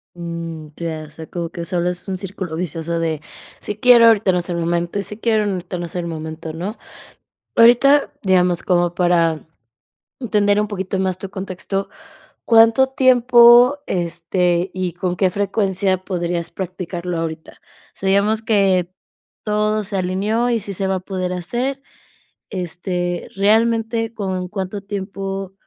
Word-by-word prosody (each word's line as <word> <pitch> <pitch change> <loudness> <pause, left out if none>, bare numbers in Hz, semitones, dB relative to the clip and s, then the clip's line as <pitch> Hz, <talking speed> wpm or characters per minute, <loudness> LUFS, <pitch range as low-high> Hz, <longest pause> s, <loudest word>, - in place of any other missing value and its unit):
Mm, 170 -2 -6
ya. 160 -2 -4
O - - -17
sea, 160 +1 -10
como 170 -1 -5
que 170 0 -6
solo 175 0 -1
es 180 +2 -5
un 190 - -2
círculo 185 -3 -6
vicioso 170 -1 -3
de 160 -2 -1 0.4
si 210 - -4
quiero, 235 0 +7
ahorita 215 -4 +4
no 180 - +1
es 175 - -5
el 175 - -2
momento 170 +2 -1
y - - -1
si 210 +3 -8
quiero, 220 -2 +1
ahorita 185 -2 -3
no 175 - -4
es 165 - -10
el 175 -1 -2
momento, 160 0 -6
¿no? 185 +7 -5 0.8
Ahorita, 245 +5 +6
digamos, 180 -3 +2
como 175 -1 +1
para 170 -3 +2 0.8
entender 205 -4 +2
un 210 - -1
poquito 190 -1 -3
más 185 -1 -1
tu 195 - -7
contexto, 195 0 -4 0.6
¿cuánto 230 +3 +5
tiempo, 250 0 +6
este, 175 +1 0
y 185 -2 -3
con 180 0 -2
qué 185 +1 +2
frecuencia 195 -1 0
podrías 175 -2 -2
practicarlo 180 -1 -5
ahorita? 160 -1 -6 0.3
Sabíamos 200 +3 +1
que 195 -5 +2 0.5
todo 215 0 0
se 200 0 -3
alineó 205 +6 0
y 235 - +1
sí 200 -1 -6
se 195 +1 -2
va 190 - 0
a 185 - -2
poder 185 -1 -3
hacer. 245 +10 -3 0.7
Este, 175 -1 -3
realmente, 225 +2 +2
¿con 190 -5 -3
cuánto 195 0 -4
tiempo, 195 -1 -5
190 Hz, 150 wpm, -20 LUFS, 175-210 Hz, 0.8 s, quiero